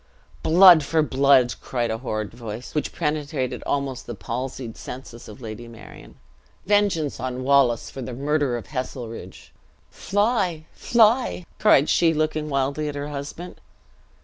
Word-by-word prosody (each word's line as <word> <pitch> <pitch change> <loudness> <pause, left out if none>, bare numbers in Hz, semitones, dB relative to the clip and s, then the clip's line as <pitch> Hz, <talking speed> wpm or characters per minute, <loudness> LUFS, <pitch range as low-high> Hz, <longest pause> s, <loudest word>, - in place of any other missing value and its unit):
"Blood 175 -1 +7
for 160 +2 +1
blood!" 135 -3 +4
cried 120 -3 -2
a 110 - -3
horrid 110 -4 -4
voice, 115 0 -8
which 150 - -2
penetrated 150 -5 -2
the - - -9
almost 135 -2 -2
palsied 125 -1 -5
senses 120 -3 -9
of 105 +5 -12
Lady 115 +1 -8
Marion. 115 -1 -13 0.5
"Vengence 200 -9 +1
on 130 0 -4
Wallace, 135 -4 +3
for 135 - -7
the 125 0 -6
murder 140 -2 0
of 120 - -8
Heselrigge!" 125 -4 -7 0.4
"Fly, 200 -6 0
fly!" 230 -5 +2
cried 155 -9 +5
she, 165 -2 +3
looking 155 0 -1
wildly 140 +2 -1
at 145 - -6
her 145 +1 -4
husband. 145 +5 -7
140 Hz, 140 wpm, -23 LUFS, 125-155 Hz, 0.5 s, Blood